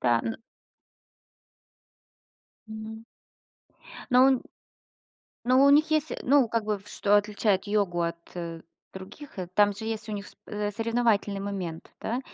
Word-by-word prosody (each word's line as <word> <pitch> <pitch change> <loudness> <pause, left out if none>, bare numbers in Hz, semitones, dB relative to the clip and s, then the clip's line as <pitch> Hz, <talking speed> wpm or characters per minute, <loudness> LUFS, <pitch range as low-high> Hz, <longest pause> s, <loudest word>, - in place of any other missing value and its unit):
Да, 120 -2 +3
н 225 0 -4 2.3
М. 220 +1 -8 1.1
Но 250 +1 +7
он 265 -2 +4 1.0
но 255 +3 +5
у - - +7
них 310 +2 +5
есть, 310 0 +1
э, - - -4
ну, 270 -2 +4
как 230 0 -1
бы, 210 -1 0
в 200 +2 -18
что 205 0 +3
отличает 205 -1 +1
йогу 200 -5 +1
от, 170 0 -1 0.2
э, 165 -2 -5 0.3
других, 190 +6 -10
э, 180 - -4
там 205 0 +4
же 220 +2 -7
есть 220 0 -4
у 215 - -5
них 205 -1 -5
с - - -15
э, 210 0 -2
соревновательный 225 -2 +1
момент, 190 -5 -5
да? 235 +3 -2
210 Hz, 150 wpm, -27 LUFS, 195-230 Hz, 2.3 s, Но